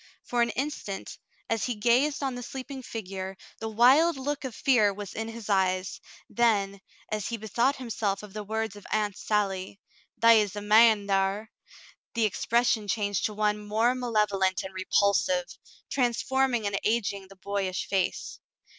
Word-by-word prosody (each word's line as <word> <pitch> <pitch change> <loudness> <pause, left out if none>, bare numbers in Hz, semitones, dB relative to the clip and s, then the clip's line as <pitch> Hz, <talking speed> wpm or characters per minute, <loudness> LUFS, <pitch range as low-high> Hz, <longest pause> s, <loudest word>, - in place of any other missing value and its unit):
For 240 -1 0
an 235 - +3
instant, 265 -8 -4 0.3
as 225 -1 0
he 245 - -2
gazed 250 +7 +2
on 270 -1 -1
the 245 - -6
sleeping 265 +2 -7
figure, 195 -5 -6 0.2
the 225 - -4
wild 265 +9 +5
look 285 +2 -3
of 250 -4 -5
fear 220 -7 +3
was 200 -1 -7
in 225 0 -4
his 225 -1 -8
eyes; 185 -2 0 0.3
then, 200 -4 +1 0.3
as 215 -2 -2
he 235 - -3
bethought 235 +6 +1
himself 215 -5 -2
of 205 -2 -11
the 210 0 -5
words 220 0 -3
of 205 - -12
Aunt 210 -2 0
Sally, 195 -2 -2 0.4
"They 230 -1 +6
is 205 -1 -3
a - - -3
man 215 0 +5
thar," 195 +2 0 0.6
the 230 -1 +2
ex 205 - -3
pression 235 -2 +2
changed 205 -2 0
to 210 - -2
one 210 0 +1
more 220 +4 +1
malevolent 210 -6 0
and 190 0 -8
repulsive, 200 +8 +2 0.4
transforming 250 -1 +1
and 200 -1 -1
aging 205 -3 -1
the 195 - -15
boyish 190 -1 -3
face. 190 -2 -2
215 Hz, 165 wpm, -27 LUFS, 200-240 Hz, 0.6 s, They